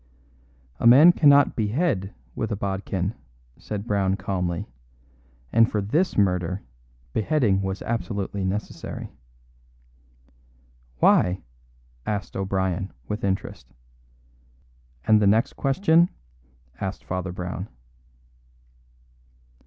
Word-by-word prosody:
"A - - +3
man 145 +9 +9
cannot 145 -4 +5
behead 110 - -1 0.2
with - - -3
a - - 0
bodkin," 95 0 -2 0.5
said 105 -1 -5
Brown 100 -3 +1
calmly, 90 -4 -2 0.9
"and 115 0 +5
for 105 - 0
this 150 - 0
murder 90 -2 +1 0.5
beheading 110 -5 +2
was 95 0 -3
absolutely 100 -4 -3
necessary." 95 +3 -4 1.9
"Why?" 90 +8 +3 0.6
asked 100 -1 -4
O'Brien, 95 -1 -1 0.2
with 105 - -4
interest. 70 -10 -3 1.3
"And 110 -1 +5
the 100 - +4
next 110 +3 +3
question?" 160 +4 +3 0.7
asked 95 +1 -4
Father 90 0 -3
Brown. 90 +2 -5
100 Hz, 90 wpm, -24 LUFS, 95-115 Hz, 1.9 s, man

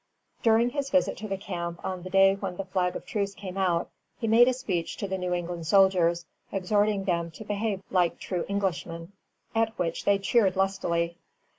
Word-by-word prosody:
_] - - -34
During 230 +1 +4
his 280 -1 -2
visit 275 - +2
to 215 - -6
the 195 -1 -2
camp 170 -3 -5
on 185 -1 -3
the 185 - -7
day 195 0 +6
when 195 -2 -5
the 195 - -4
flag 185 -1 0
of - - -6
truce 200 -2 -2
came 185 -2 -7
out, 180 -3 0 0.3
he - - -4
made 230 +3 +6
a 255 - +3
speech 195 -10 -3
to 200 - -3
the 190 - -2
New 180 0 -2
England 175 -2 -3
soldiers, 175 -3 +4 0.3
exhorting 205 +1 +1
them 170 -3 0
to 190 +7 -11
behave 205 -1 -2
like 180 -2 +2
true 180 -3 -3
Englishmen; 175 -3 -2 0.4
at 225 0 0
which 165 -2 -2
they 200 0 +4
cheered 195 -1 +2
lustily. 170 -3 0
190 Hz, 195 wpm, -27 LUFS, 175-205 Hz, 0.4 s, day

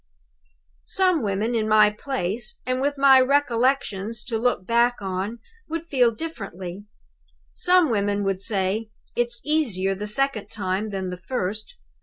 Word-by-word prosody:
"Some 370 -5 +2
women 210 +2 -1
in 220 -2 0
my 215 -1 +6
place, 215 -2 -3
and 255 0 -1
with 285 +1 0
my 275 -1 +7
recollections 250 -5 +1
to 225 -3 -2
look 230 -6 0
back 235 +3 +3
on 195 +3 -3 0.3
would 330 +1 -3
feel 255 -7 +3
it 225 - -10
differently. 195 - -7 0.7
Some 360 -6 +4
women 205 -1 0
would 195 -1 -1
say, 200 +2 0 0.3
'It's 240 -1 -1
easier 230 -12 +1
the 205 +2 -5
second 255 0 -1
time 195 +1 -2
than 190 -2 -3
the 180 - -5
first. 215 - -3
225 Hz, 145 wpm, -24 LUFS, 200-265 Hz, 0.7 s, my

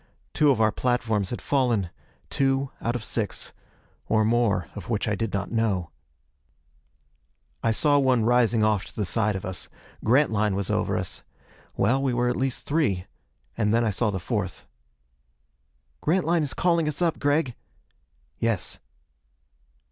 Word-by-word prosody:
Two 150 - +4
of 130 -5 +3
our 110 -1 +4
platforms 110 -5 0
had 120 - -5
fallen 120 -10 +1 0.4
two 135 0 +1
out 120 +1 -1
of 120 - -3
six. 110 -3 -2 0.5
Or 110 -1 +3
more, 110 -7 +2
of - - -8
which 105 -3 0
I 105 - +1
did 110 +1 -2
not 100 - -3
know. 105 -7 0 1.7
I 115 - +1
saw 145 +6 +3
one 130 -5 +3
rising 120 -2 +3
off 105 -2 +2
to - - -13
the 105 - -1
side 105 +2 0
of 95 - -5
us. 95 -1 -5 0.3
Grantline 110 -5 +3
was 100 -1 -2
over - - 0
us. - - -4 0.6
Well, 130 +7 +2
we 130 -3 0
were 120 0 +2
at 125 - 0
least 130 -1 -2
three. 135 - +1 0.5
And 105 -2 +1
then 115 +1 +3
I 110 - +1
saw 105 +3 +1
the 95 -2 -2
fourth. - - -3 1.4
"Grantline 170 0 +2
is 145 -3 -2
calling 170 -3 +2
us 150 - -2
up, 170 -3 +1
Gregg." 145 -2 +1 0.9
"Yes." 115 -5 -1
115 Hz, 155 wpm, -25 LUFS, 105-135 Hz, 1.7 s, Two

